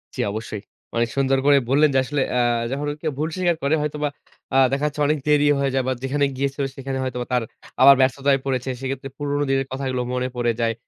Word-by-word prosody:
জি - - -2
অবশ্যই। 110 -1 -5 0.3
অনেক 115 0 +1
সুন্দর 135 0 +2
করেই 140 -1 +5
বললেন 145 +3 +4
যে - - +5
আসলে 140 +1 -2
অ্যা 125 -1 +2 0.3
যখন 145 +2 -2
কেউ 155 - -1
ভুল 155 +1 0
স্বীকার 175 -2 +1
করে 140 +3 +3
হয়তোবা 150 0 -2 0.5
আ - - +5
দেখা 140 +2 0
যাচ্ছে 150 0 -4
অনেক 155 +1 +2
দেরি 150 0 +4
হয়ে 135 -1 +1
যায় 135 -1 +1
বা - - +1
যেখানে 140 +2 +1
গিয়েছিল 140 +1 -1
সেখানে 135 0 -4
হয়তো 130 -1 -3
বা - - -5
তার 125 -2 +2 0.4
আবার 140 0 +9
ব্যস্ততায় 135 +1 +2
পড়েছে। 130 -1 -1
সেক্ষেত্রে 135 0 -4
পুরনো 145 0 -1
দিনের 135 0 +1
কথাগুলো 130 -1 -2
মনে 125 0 -1
পড়ে 120 -1 +1
যায়। 115 0 +1
135 Hz, 215 wpm, -22 LUFS, 130-145 Hz, 0.5 s, আবার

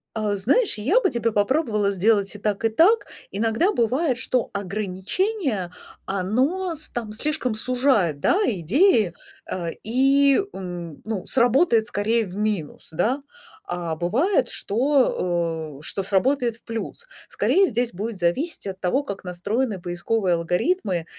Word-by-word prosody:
А, 210 -2 0
знаешь, 255 - +2
я 280 - +3
бы 385 - +2
тебе 235 -2 0
попробовала 210 -1 +1
сделать 200 +1 +2
и - - -8
так, 210 +1 -1
и - - +4
так. 355 - +4 0.3
Иногда 225 - +1
бывает, 255 - +1
что 250 -1 -1
ограничение, 205 - -2 0.3
оно 260 - 0
с 310 - -6
там 225 -3 -5
слишком 275 0 -1
сужает, 235 - +1
да, 355 - +2
идеи, 215 - +3 0.4
а, 175 -2 -3
и, 270 - +4
м, 175 -4 -7
ну, 215 -4 -3
сработает 240 -2 +3
скорее 225 0 +1
в 185 -1 -9
минус, 210 -7 -3
да. 220 - 0 0.5
А 170 -2 -2
бывает, 265 - +1
что, 175 - 0
о, - - -13
что 195 - -1
сработает 235 +5 +1
в 230 - -24
плюс. 230 - -5 0.2
Скорее, 390 +1 +3
здесь 240 -3 -1
будет 210 +4 -4
зависеть 190 - -1
от 190 -1 -6
того, 225 +11 +1
как 200 -8 -6
настроены 200 +5 -2
поисковые 180 +3 -1
алгоритмы. 175 - 0
220 Hz, 140 wpm, -23 LUFS, 185-265 Hz, 0.5 s, и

